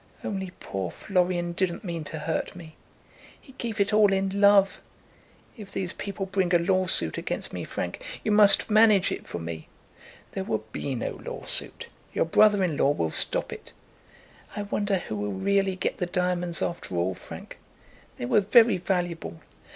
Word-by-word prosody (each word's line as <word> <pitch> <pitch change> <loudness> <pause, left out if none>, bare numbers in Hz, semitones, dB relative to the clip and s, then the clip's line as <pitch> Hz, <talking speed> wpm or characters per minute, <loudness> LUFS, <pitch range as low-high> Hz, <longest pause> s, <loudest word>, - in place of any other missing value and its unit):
Only 190 -2 -4
poor 95 -2 -4
Florian 180 - 0
didn't 175 0 -2
mean 170 -4 -4
to 160 - -6
hurt 160 +3 -3
me. 165 -3 -11 0.6
He 265 - -17
gave 230 -3 -4
it 200 +1 +2
all 210 -1 +5
in 195 +1 0
love. 200 -1 +5 0.8
If 205 -3 -10
these 185 -2 -3
people 200 -1 -5
bring 190 -2 +1
a - - +8
lawsuit 185 +1 +3
against - - -4
me, - - -4
Frank, - - -5 0.2
you 215 - 0
must 210 -1 +6
manage 215 -3 +5
it - - -5
for - - -5
me." 80 -1 -6 0.6
"There 190 - -3
will 110 - -2
be 135 +3 -3
no 115 - -4
lawsuit. - - -4 0.3
Your - - +1
brother 205 +4 +4
in 165 -5 0
law - - +3
will 85 - 0
stop - - 0
it." - - -11 0.8
"I 205 - -3
wonder 205 0 -1
who 110 - -5
will 105 -1 -3
really 195 - +1
get 185 - -2
the 180 - -1
diamonds 180 -1 -1
after 170 - -4
all, 90 +2 0
Frank? - - -11 0.6
They - - -4
were 205 - +3
very 225 +1 +5
valuable. 175 - -3
185 Hz, 170 wpm, -26 LUFS, 165-200 Hz, 0.8 s, a